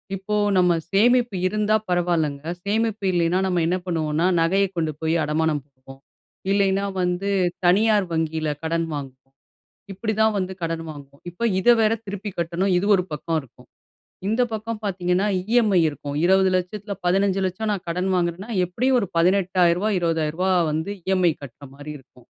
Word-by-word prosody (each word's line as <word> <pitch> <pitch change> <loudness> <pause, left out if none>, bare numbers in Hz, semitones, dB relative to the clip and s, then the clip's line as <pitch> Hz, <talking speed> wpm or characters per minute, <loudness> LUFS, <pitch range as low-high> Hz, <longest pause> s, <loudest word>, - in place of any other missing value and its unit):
இப்போ 195 +2 -3 0.2
நம்ம 180 -1 +4 0.2
சேமிப்பு 240 +2 +3
இருந்தா 215 +2 +1
பரவாயில்லங்க. 170 -5 0 0.2
சேமிப்பு 215 0 -1
இல்லைனா 170 +1 +2
நம்ம 180 -2 +1
என்ன 180 - +1
பண்ணுவோம்னா, 160 -1 0
நகைய 190 +4 +3
கொண்டு 160 -2 0
போய் 160 +1 +1
அடமானம் 150 -1 0
வைப்போம், 135 -1 -16 0.5
இல்லைனா 200 0 +2 0.2
வந்து 180 +3 -1 0.4
தனியார் 205 +1 +4
வங்கியில 160 -1 -1
கடன் 165 0 -1
வாங்குவோம். 135 -1 -9 0.6
இப்டிதான் 220 +1 0
வந்து 190 0 -3
கடன் 165 0 -2
வாங்குவோம். 140 -1 -14
இப்ப 205 +7 -4
இத 240 - +2
வேற 220 +1 +3
திருப்பி 205 +1 -5
கட்டணும் 170 +3 0
இது 185 - 0
ஒரு 180 - 0
பக்கம் 160 +2 -2
இருக்கும். 130 - -19 0.6
இந்த 230 +4 +2
பக்கம் 220 +1 -4
பார்த்தீங்கன்னா, 185 0 0 0.3
இஎம்ஐ 220 -6 +4
இருக்கும். 145 0 -6
2000000த்தில 190 +2 +1
1500000 195 +2 +1
நான் 195 -2 -4
கடன் 180 +3 -1
வாங்குறன்னா 180 +5 -2
எப்டியும் 250 +9 +1
ஒரு 200 - -2
18000ரூவா 180 +1 +2
20000ரூவா 165 +2 0 0.2
வந்து 160 +5 -2
இஎம்ஐ 185 -3 +2
கட்ற 140 0 -11
மாரி 145 +2 -9
இருக்கும். 125 -2 -22
180 Hz, 140 wpm, -23 LUFS, 160-200 Hz, 0.6 s, நம்ம